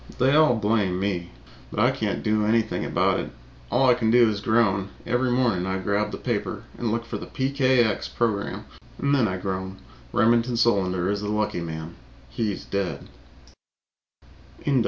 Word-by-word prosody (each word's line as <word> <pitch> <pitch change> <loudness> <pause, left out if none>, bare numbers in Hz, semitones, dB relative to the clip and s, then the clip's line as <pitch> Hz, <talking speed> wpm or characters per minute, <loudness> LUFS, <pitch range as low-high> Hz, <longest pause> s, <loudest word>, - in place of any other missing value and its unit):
They 130 +2 +3
all 155 -5 +5
blame 105 -4 +1
me, 95 -3 -2 0.4
but - - -5
I - - +4
can't - - -2
do 105 0 +1
anything 110 +1 +1
about - - +1
it. - - -4 0.4
All 135 +1 +3
I 125 - +7
can 120 -2 0
do 120 0 +6
is 100 -1 -4
groan 100 -4 +2 0.2
every 125 +1 +1
morning 120 -8 +1
I 95 0 -1
grab 100 +2 -1
the - - -5
paper - - -3
and 115 -2 -2
look 115 +1 -2
for - - -5
the - - -8
PKX 130 -5 +1
program 110 -4 -1 0.3
and 140 0 0
then 130 -5 +3
I 95 -1 -2
groan. 95 0 -4 0.3
Remington 115 +1 +2
Solander 95 -6 +2
is 100 0 -2
the 105 - -3
lucky 105 -2 -1
man 80 0 -6 0.3
he's 100 - -3
dead. 100 -2 -3
110 Hz, 165 wpm, -25 LUFS, 95-120 Hz, 0.4 s, I